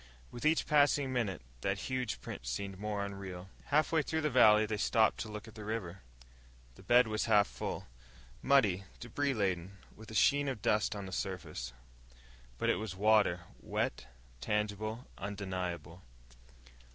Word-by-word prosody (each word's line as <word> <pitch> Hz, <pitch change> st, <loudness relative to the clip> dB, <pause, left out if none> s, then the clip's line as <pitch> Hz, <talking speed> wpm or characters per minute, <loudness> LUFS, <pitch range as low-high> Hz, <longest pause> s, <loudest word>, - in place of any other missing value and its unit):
With 120 Hz, +5 st, -1 dB
each 160 Hz, +1 st, +3 dB
passing 145 Hz, -2 st, +3 dB
minute, 105 Hz, -, -1 dB, 0.2 s
that 100 Hz, +5 st, 0 dB
huge 125 Hz, -1 st, -3 dB
print -, -, -7 dB
seemed 95 Hz, +8 st, -4 dB
more 105 Hz, -1 st, -2 dB
unreal. 95 Hz, -2 st, -7 dB, 0.2 s
Halfway 155 Hz, +2 st, +3 dB
through 160 Hz, +2 st, -2 dB
the 150 Hz, -1 st, 0 dB
valley 105 Hz, 0 st, +6 dB
they 105 Hz, 0 st, -2 dB
stopped 110 Hz, +1 st, +3 dB
to 110 Hz, -, -4 dB
look 105 Hz, +1 st, -7 dB
at 110 Hz, -, -12 dB
the 110 Hz, -, -9 dB
river. 105 Hz, -4 st, -4 dB, 0.7 s
The -, -, -16 dB
bed 125 Hz, +1 st, +5 dB
was 110 Hz, 0 st, -1 dB
half 105 Hz, -3 st, +5 dB
full -, -, -5 dB, 0.6 s
muddy, 105 Hz, -9 st, +3 dB
debris 135 Hz, +3 st, -1 dB
laden, 95 Hz, -2 st, -1 dB, 0.2 s
with 110 Hz, 0 st, -12 dB
a 110 Hz, -, -8 dB
sheen 145 Hz, +6 st, +4 dB
of 130 Hz, -7 st, -3 dB
dust 105 Hz, 0 st, +2 dB
on 100 Hz, -1 st, -5 dB
the 95 Hz, -, -8 dB
surface. 90 Hz, -10 st, -4 dB, 0.9 s
But -, -, +2 dB
it -, -, 0 dB
was 105 Hz, -4 st, -5 dB
water 105 Hz, -3 st, +4 dB, 0.2 s
wet, -, -, -2 dB, 0.3 s
tangible, 105 Hz, -, -2 dB
undeniable. 90 Hz, -4 st, -4 dB
105 Hz, 155 wpm, -33 LUFS, 95-120 Hz, 0.9 s, valley